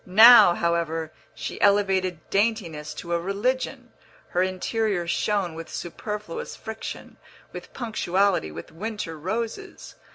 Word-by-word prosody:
Now, 215 Hz, -1 st, +8 dB
however, 165 Hz, -2 st, -1 dB, 0.2 s
she -, -, -6 dB
elevated 190 Hz, -4 st, +2 dB
daintiness 180 Hz, -8 st, -1 dB
to 170 Hz, +2 st, -5 dB
a 170 Hz, -, +2 dB
religion; 245 Hz, +7 st, -2 dB, 0.4 s
her 180 Hz, -, +1 dB
interior 185 Hz, +1 st, -1 dB
shone 190 Hz, 0 st, 0 dB
with 165 Hz, 0 st, -8 dB
superfluous 205 Hz, +1 st, -6 dB
friction, 220 Hz, 0 st, -8 dB, 0.4 s
with -, -, -9 dB
punctuality, 200 Hz, -, 0 dB
with 85 Hz, -, -9 dB
winter 205 Hz, -1 st, -5 dB
roses. 225 Hz, -, -5 dB
190 Hz, 110 wpm, -25 LUFS, 170-220 Hz, 0.4 s, Now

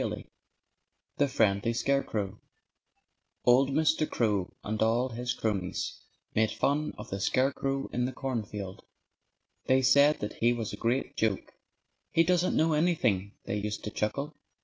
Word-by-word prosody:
V -, -, -3 dB, 0.9 s
THE 145 Hz, -, +3 dB
FRIENDLY 105 Hz, -3 st, +2 dB
SCARECROW 110 Hz, -6 st, -1 dB, 1.1 s
Old 130 Hz, +3 st, +5 dB
Mr. 155 Hz, +2 st, +2 dB
Crow 105 Hz, -6 st, 0 dB
and 110 Hz, +1 st, -3 dB
all 115 Hz, +3 st, +2 dB
his 120 Hz, +1 st, -3 dB
cronies 100 Hz, -5 st, -2 dB, 0.3 s
made 110 Hz, 0 st, +3 dB
fun 150 Hz, +2 st, 0 dB
of -, -, -9 dB
the 100 Hz, -, -3 dB
scarecrow 135 Hz, +5 st, 0 dB
in 125 Hz, 0 st, +1 dB
the 130 Hz, -, -2 dB
cornfield. 105 Hz, -7 st, -5 dB, 0.8 s
They 130 Hz, 0 st, +4 dB
said 140 Hz, +3 st, +5 dB
that 105 Hz, -, -4 dB
he 120 Hz, +1 st, +3 dB
was 115 Hz, -4 st, -4 dB
a -, -, -2 dB
great 120 Hz, +5 st, -1 dB
joke. 110 Hz, -4 st, -1 dB, 0.6 s
"He 165 Hz, -, +4 dB
doesn't 180 Hz, +1 st, +2 dB
know 160 Hz, 0 st, +3 dB
anything," 120 Hz, -, +1 dB
they 105 Hz, -, -2 dB
used 105 Hz, 0 st, -3 dB
to 105 Hz, -, -4 dB
chuckle. 140 Hz, +10 st, -2 dB
120 Hz, 145 wpm, -29 LUFS, 105-140 Hz, 1.1 s, Old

